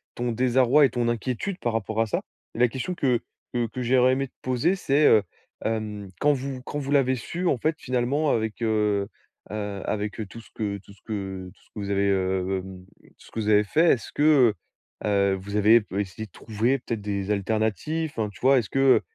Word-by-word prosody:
ton 120 0 -1
désarroi 130 +4 +4
et 135 - +2
ton 120 0 -1
inquiétude 125 - -2
par 120 -2 -1
rapport 110 0 -1
à - - +3
ça. - - -1 0.3
La 120 +1 +4
question 130 +10 -4
que 125 -7 +1 0.3
que 120 -1 +1
que 125 +4 -6
j'aurais 125 +1 +4
aimé 135 +1 -1
te - - -32
poser, 130 +9 +1
c'est, 150 -5 +2
heu, 105 -2 +6 0.4
hem, 105 -3 -3
quand 150 0 +4
vous 135 -1 -4
quand 145 - -5
vous 140 0 -4
l'avez 130 -2 +3
su, 175 +9 -3
en 135 - +2
fait, 155 +5 0
finalement, 130 +4 0
avec, 110 0 -1
heu 105 -3 +1 0.4
heu, 105 -2 -4
avec 105 -1 -2
tout 115 +4 -10
ce - - -19
que 105 -2 -2
tout 100 +1 -16
ce 100 - -24
que 95 -4 -5
tout - - -28
ce - - -27
que 105 - -5
vous 100 - -4
avez, 100 0 +2
heu, 95 0 0
hem, 95 -1 -10 0.3
ce - - -17
que - - -4
vous 105 -1 -1
avez 105 0 +5
fait, 165 +10 +4
est - - +4
ce 110 - -11
que, 145 - 0 0.8
heu - - 0
heu, 100 -1 +3
vous 100 +2 -4
avez 110 +3 +6
p 100 -1 -5
essayé 100 +2 -4
de 95 - -34
trouver, 115 +5 -1
peut-être, 115 -3 -4
des 100 -1 -3
alternatives? 110 +10 -1
Enfin, 110 -2 -1
tu 100 - -15
vois, 135 +1 +5
est - - +4
ce - - -10
que, 135 - -1
heu, 135 -1 +5
115 Hz, 230 wpm, -25 LUFS, 100-130 Hz, 0.8 s, heu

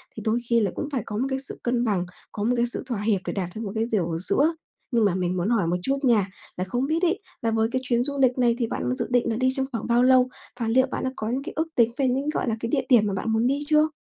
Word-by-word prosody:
thì 220 - -6
đôi 225 +2 +2
khi 235 -1 +4
là 200 -4 0
cũng 295 - -4
phải 265 -5 -1
có 210 - -5
một 255 - 0
cái 265 0 -1
sự 275 - +2
cân 240 0 +1
bằng, 195 -5 0 0.3
có 205 - -4
một 245 +3 +2
cái 240 - +3
sự - - +1
thỏa 235 -6 -3
hiệp 210 -3 +1
để - - -3
đạt 185 -3 -3
được 220 - -5
một 200 - -4
cái 220 +1 +1
điều 180 -6 0
ở 165 - -1
giữa. 290 - +2 0.4
Nhưng 230 -3 +3
mà 185 -3 +2
mình 180 0 -1
muốn 180 +4 0
hỏi 215 -8 +2
một 175 - +1
chút 275 +5 +1
nha, 215 -6 +3 0.3
là 185 - -1
không 245 +8 -2
biết 325 +3 0
ấy 360 +4 +2 0.2
là 225 -1 0
với 220 0 +2
cái 260 0 -1
chuyến 240 -1 +1
du 280 +1 -3
lịch 255 0 +3
này 240 -2 +3
thì 230 - 0
bạn 125 - -2
dự - - +3
định 245 -1 +2
là 225 - 0
đi 255 +3 +2
trong 265 0 0
khoảng 230 -1 -4
bao 240 +1 +3
lâu, 255 0 +5 0.3
và 230 - -1
liệu 260 +3 +3
bạn - - -3
đã 260 - -1
có 215 +1 -4
những 265 +3 -2
cái - - -7
ước 320 +1 0
tính 235 -1 +4
về 270 -2 +2
những 270 +4 0
gọi 305 - -1
là 225 - 0
cái 230 - -3
địa 270 -1 0
điểm 235 -5 +6
mà 200 - -1
bạn 210 +4 -2
muốn 225 +2 +2
đi 275 +2 +1
chưa? 305 0 +4
235 Hz, 325 wpm, -25 LUFS, 215-260 Hz, 0.4 s, điểm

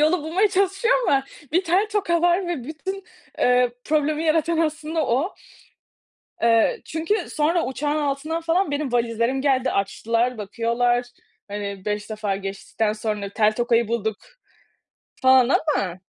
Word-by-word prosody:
yolu 310 +2 +3
bulmaya 360 +7 +2
çalışıyor 390 +4 +2
ama 270 -7 +2 0.3
bir 360 +3 +2
tel 375 +6 +2
toka 345 -5 +1
var 350 +2 +3
ve 330 -9 -3
bütün, 380 +6 -6 0.3
eee, 250 0 +3
problemi 310 +1 0
yaratan 325 +1 +2
aslında 315 -1 -1
o. 270 +11 0 1.1
Eee, 230 - +3
çünkü 325 +6 -1 0.2
sonra 325 +3 +1
uçağın 290 +3 -2
altından 300 +3 -2
falan 335 +1 +1
benim 285 -3 -2
valizlerim 235 +2 0
geldi. 265 -2 +2
Açtılar, 230 +5 0
bakıyorlar, 235 +3 0 0.4
hani, 200 -1 -5
5 210 +1 -3
defa 210 -2 -2
geçtikten 200 +2 -3
sonra 210 -2 -3
tel 210 +1 +2
tokayı 235 -1 +1
bulduk 220 -2 -1 1.1
falan 260 -1 +6 0.3
ama 185 -2 -2
270 Hz, 135 wpm, -23 LUFS, 230-325 Hz, 1.1 s, falan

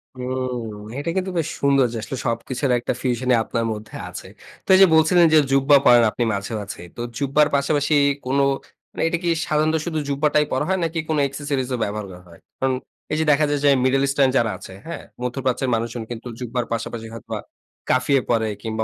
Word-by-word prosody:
হুম। 125 -1 -3 0.3
এটা 145 +4 -3
কিন্তু 190 0 -1
বেশ 160 - -1
সুন্দর 140 -2 +4
যে, - - -3
আসলে 130 - -5
সব 115 0 +1
কিছুর 130 0 -1
একটা 120 - -2
ফিউশনই 125 0 +1
আপনার 115 0 -2
মধ্যে 110 0 -9
আছে। - - -9 0.4
তো - - -54
এই - - +5
যে - - +11
বলছিলেন 170 +2 +5
যে, - - +8
জুব্বা 135 +1 +5
পরেন 120 -1 +7
আপনি 120 - -1
মাঝে-মাঝেই। 100 -3 -5
তো - - -4 0.2
জুব্বার 145 +2 +3
পাশাপাশি 145 +2 +1 0.3
কোন, 135 +2 0 0.5
মানে - - -6
এইটা 170 - 0
কি 170 - +1 0.2
সাধারণত 155 +1 +1
শুধু 160 -2 -2
জুব্বাটাই 150 +1 +2
পরা 150 - 0
হয়, 190 - +2
নাকি 165 0 -1
কোন 155 - +1
এক্সেসরিজ 140 -2 -3
ও - - -3
ব্যবহার 105 0 -3
করা 90 0 -11
হয়? 85 - -16 0.2
কারণ 130 -1 +1 0.4
এই 155 - 0
যে - - +2
দেখা 150 +1 +4
যায় 145 -1 0
যে, 145 - +5
মিডল 135 +1 +3
ইস্টার্ন 135 -1 +3
যারা 110 -2 +2
আছে, 95 - -11
হ্যাঁ? 170 -3 -6 0.2
মধ্যপ্রাচ্যের 130 +1 -1
মানুষজন 115 +1 -3
কিন্তু 120 +1 -6
জুব্বার 125 0 -3
পাশাপাশি 115 0 -4
হয়তোবা 115 - -6 0.5
কাফিয়ে 130 +1 +3
পরে 110 -2 +2
কিংবা 110 -1 -2
130 Hz, 200 wpm, -22 LUFS, 115-145 Hz, 0.5 s, যে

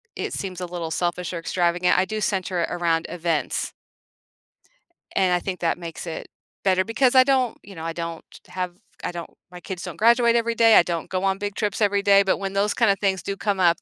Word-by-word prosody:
it - - -4
seems 185 -2 -4
a - - -2
little 170 -2 -5
selfish 175 +2 -2
or 170 - -3
extravagant; 175 +1 +1
I 185 - +3
do 215 +3 -4
center 185 -3 -1
it - - -1
around 165 -1 0
events. 170 -3 -1 1.4
And 185 -2 +3
I 175 - +2
think 185 0 -4
that 170 - 0
makes 170 0 -7
it 160 - -6 0.4
better, 185 -1 +3
because 250 +3 +2
I 260 - +9
don't 260 -3 +1
you 200 - -12
know, 160 - -7
I 165 0 -3
don't 165 -1 -5 0.2
have 180 -1 -4 0.3
I - - -2
don't 170 -1 -7 0.2
my 180 - -9
kids 180 0 -7
don't - - -7
graduate 235 +1 +4
every 235 0 +1
day, 225 -1 +6
I - - +8
don't 170 -2 -4
go 185 0 -2
on 195 0 +1
big 205 0 -4
trips 210 0 -2
every 200 -1 +3
day, 200 0 +6
but 190 - +1
when 195 0 -4
those 200 +1 +1
kinda 220 -4 +3
things 190 -2 0
do 200 - -3
come 205 -3 -1
up, 170 -2 +3
185 Hz, 225 wpm, -23 LUFS, 175-205 Hz, 1.4 s, I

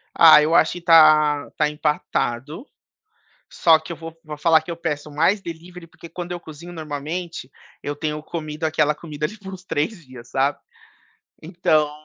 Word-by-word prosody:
Ah, 160 -2 +8
eu 155 +2 +1
acho 175 - +2
tá 155 -3 +5
tá 150 -1 +2
empatado. 150 - -2 0.9
Só 165 -2 +4
que 160 +2 -9
eu 170 - -7
vou 165 0 -10
vou 150 -1 -8
falar 160 0 +4
que 170 - -9
eu 170 - -4
peço 150 -3 -4
mais 165 +8 +1
delivery, 170 +1 -9
porque 170 0 -14
quando 175 +1 -7
eu 175 - -5
cozinho, 170 +2 -11
normalmente, 155 -1 -6 0.3
eu 145 - -4
tenho 150 0 -4
comido 155 -1 -6
aquela 155 -1 +1
comida 150 -1 -5
ali 215 +7 -12
por 195 -2 -10
uns 185 -1 -10
3 170 +2 -3
dias, 125 -2 -13
sabe. 135 +2 0 0.8
Então, 155 -3 +1
155 Hz, 170 wpm, -22 LUFS, 150-170 Hz, 0.9 s, Ah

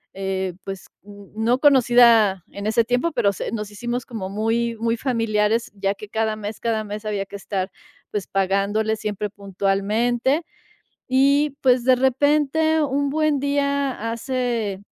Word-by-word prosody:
eh, 190 -1 -2
pues, 195 -1 -7 0.2
n 205 -1 -13
no 230 +3 +1
conocida 240 - +5
en 200 - -7
ese 230 +2 +3
tiempo, 245 +8 0
pero 230 -7 +2
se - - -5
nos 210 -2 -4
hicimos 240 +4 -4
como 210 -6 -6
muy, 225 +3 -1
muy 230 0 +1
familiares, 225 -2 0
ya 195 0 -1
que 210 - -10
cada 220 0 -1
mes 210 0 -6
cada 225 -2 -1
mes 210 +1 -6
había 205 -2 -2
que 200 - -11
estar, 190 -1 -3 0.4
pues, 205 -3 -3
pagándole, 200 +3 0
siempre 210 -1 -3
puntualmente. 210 - 0 0.7
Y, 280 +2 +3
pues, 250 -2 +3
de 255 0 +5
repente, 295 +4 +2
un 280 0 0
buen 310 -1 +1
día, 280 -4 -1
hace, 230 -5 -2
225 Hz, 150 wpm, -22 LUFS, 205-260 Hz, 0.7 s, conocida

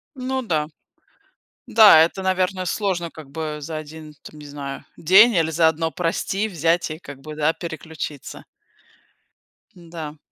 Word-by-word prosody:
Ну 260 0 -3
да, 155 -10 -1 1.0
да 210 -8 +8
это, 170 +3 -2
наверное, 185 0 0
сложно, 180 -3 -2
как 155 -3 -13
бы, 155 +1 -5
за 155 +2 -5
1 155 0 -9
де 150 - -22
там 150 - -12
не 150 - -11
знаю, 140 -1 -7
день 195 +8 +6
или 165 -3 +1
за 160 +1 +3
1, 160 0 0
прости, 190 +5 -1
взять 170 -3 0
и, 155 - -7
как 145 -5 -11
бы, 155 +1 -9
да, 155 +1 +1
переключиться. 160 -4 -7 1.3
Да. 165 -3 -9
160 Hz, 150 wpm, -22 LUFS, 155-185 Hz, 1.3 s, да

